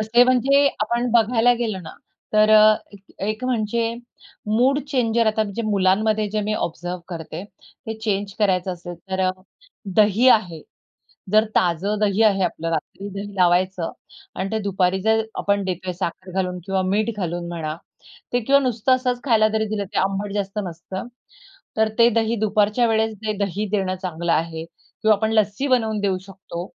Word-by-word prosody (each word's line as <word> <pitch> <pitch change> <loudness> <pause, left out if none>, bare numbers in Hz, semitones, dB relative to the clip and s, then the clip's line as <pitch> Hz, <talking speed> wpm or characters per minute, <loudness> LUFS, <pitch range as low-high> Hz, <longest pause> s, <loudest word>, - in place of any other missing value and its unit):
तसे 220 +3 +4
म्हणजे 270 +3 +4
आपण 235 +3 0
बघायला 235 +1 +4
गेलो 220 -5 -2
ना, 160 - -10 0.4
तर 215 0 +4
अ, 215 0 +7 0.2
एक 200 -1 -14 0.3
एक 215 +3 -3
म्हणजे 230 -1 0 0.6
मूड 265 +4 +3
चेंजर 235 -4 +1
आता 220 0 +2
म्हणजे 215 +2 -4
मुलांमध्ये 210 +2 +2
जे 215 +1 -1
मी 210 +1 -1
ऑब्झर्व्ह 175 -1 -4
करते. 165 0 -6 0.4
ते 220 - -3
चेंज 205 -2 -2
करायचं 185 -3 +1
असेल, 175 0 -8 0.2
तर 190 0 -1
अ, - - +3 0.7
दही 215 +4 +5
आहे. 180 -9 +3 0.7
जर 215 +1 +6
ताजं 185 +4 +1
दही 210 0 +2
आहे 200 -3 +3
आपलं, 165 -1 -3
रात्री 165 +5 -4
दही 200 0 -6
लावायचं 180 -1 +2 0.4
आणि 190 +1 -3
ते 220 - +1
दुपारी 190 -1 +1
जर 220 +1 +3 0.2
आपण 200 0 +1
देतोय 185 0 -3
साखर 185 +1 -5
घालून 180 -1 -2
किंवा 195 -1 0
मीठ 205 +4 0
घालून 175 -3 -3
म्हणा. 160 -3 -4 0.6
ते 245 - +2
किंवा 275 +4 +4
नुसतं 250 -1 +1
असच 250 -1 -2
खायला 220 -4 +4
जरी 220 0 0
दिलं, 205 -1 -2
ते 200 +2 -4
आंबट 195 +1 -1
जास्त 200 0 -3
नसतं. 180 +4 -7 0.7
तर 220 0 +3
ते 235 - +7
दही 230 0 +1
दुपारच्या 215 +2 +2
वेळेस 220 0 +1
ते 215 - 0
दही 200 +2 -3
देणं 190 -3 0
चांगलं 170 -2 -2
आहे 160 0 -1
किंवा 215 +5 -1
आपण 220 +2 -1
लस्सी 215 +4 +1
बनवून 220 -5 +1
देऊ 195 -2 0
शकतो. 185 -2 -8
205 Hz, 170 wpm, -22 LUFS, 185-220 Hz, 0.7 s, अ